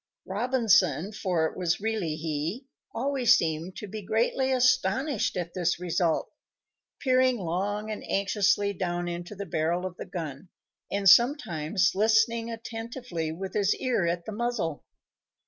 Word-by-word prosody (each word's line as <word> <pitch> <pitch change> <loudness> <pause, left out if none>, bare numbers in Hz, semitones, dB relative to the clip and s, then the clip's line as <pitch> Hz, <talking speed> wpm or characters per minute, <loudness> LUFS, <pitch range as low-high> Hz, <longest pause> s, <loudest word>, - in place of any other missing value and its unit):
Robinson, 215 - +2
for 185 -6 0
it - - -3
was 175 -1 0
really 205 -7 -1
he, 160 - -3 0.3
always 265 0 +3
seemed 165 +3 -2
to 210 - -7
be 215 +2 -6
greatly 235 +6 0
astonished 255 -1 +2
at 175 -1 -4
this 175 -1 0
result, 175 -2 0 0.7
peering 255 -1 +3
long 205 +4 -2
and 215 - -5
anxiously 200 +1 +2
down 175 -1 -2
into 175 +3 -5
the 200 +1 -5
barrel 170 +2 -1
of 180 -2 -6
the - - -7
gun, 160 -1 -6 0.4
and 200 0 0
sometimes 190 - +4
listening 220 +3 +2
attentively, 225 -7 -5
with 185 +3 -6
his 205 -1 +2
ear 240 -9 0
at 170 0 -2
the - - -5
muzzle. 210 -8 -2
200 Hz, 140 wpm, -27 LUFS, 175-230 Hz, 0.7 s, sometimes